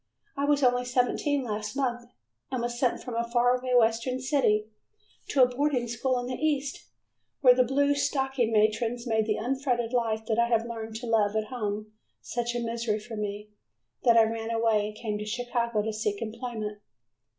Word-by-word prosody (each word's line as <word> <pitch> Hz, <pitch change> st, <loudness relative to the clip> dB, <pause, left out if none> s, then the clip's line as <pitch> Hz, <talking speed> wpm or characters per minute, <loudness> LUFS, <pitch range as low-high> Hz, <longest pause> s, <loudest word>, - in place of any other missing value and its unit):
I 280 Hz, -, 0 dB
was 290 Hz, -1 st, +2 dB
only 245 Hz, 0 st, +3 dB
seventeen 255 Hz, +3 st, +1 dB
last 215 Hz, 0 st, -4 dB
month 245 Hz, -3 st, -2 dB, 0.4 s
and 255 Hz, -3 st, -2 dB
was 240 Hz, 0 st, -3 dB
sent 250 Hz, -2 st, +1 dB
from 250 Hz, -, -6 dB
a 230 Hz, 0 st, 0 dB
faraway 250 Hz, +1 st, +2 dB
western 230 Hz, +2 st, +2 dB
city 255 Hz, -6 st, +2 dB, 0.6 s
to 270 Hz, -, +4 dB
a -, -, +6 dB
boarding 250 Hz, -1 st, 0 dB
school 250 Hz, +2 st, 0 dB
in 245 Hz, -, -3 dB
the 255 Hz, -, -4 dB
east, 285 Hz, -3 st, -1 dB, 0.5 s
where 250 Hz, -2 st, +8 dB
the 255 Hz, 0 st, +4 dB
"blue 280 Hz, +3 st, +2 dB
stocking" 270 Hz, -4 st, 0 dB
matrons 225 Hz, +3 st, +1 dB
made 220 Hz, -2 st, +1 dB
the 215 Hz, -, +1 dB
unfettered 245 Hz, -1 st, -1 dB
life 225 Hz, -2 st, 0 dB
that 220 Hz, 0 st, 0 dB
I 235 Hz, -, +4 dB
had 230 Hz, -1 st, +2 dB
learned 225 Hz, -1 st, -6 dB
to 235 Hz, +2 st, -5 dB
love 220 Hz, -2 st, +2 dB
at 215 Hz, 0 st, -1 dB
home 215 Hz, -3 st, -4 dB, 0.3 s
such 240 Hz, 0 st, -3 dB
a -, -, 0 dB
misery 230 Hz, -2 st, -1 dB
for 225 Hz, +2 st, -8 dB
me, 210 Hz, 0 st, -5 dB, 0.5 s
that 235 Hz, -2 st, +5 dB
I 225 Hz, -, +8 dB
ran 225 Hz, 0 st, -2 dB
away 225 Hz, -2 st, +2 dB
and 210 Hz, -, -8 dB
came 210 Hz, -2 st, -3 dB
to 210 Hz, -, -4 dB
Chicago 235 Hz, -1 st, -1 dB
to 220 Hz, 0 st, -2 dB
seek 210 Hz, -1 st, -2 dB
employment. 220 Hz, -2 st, -5 dB
235 Hz, 185 wpm, -28 LUFS, 220-250 Hz, 0.6 s, where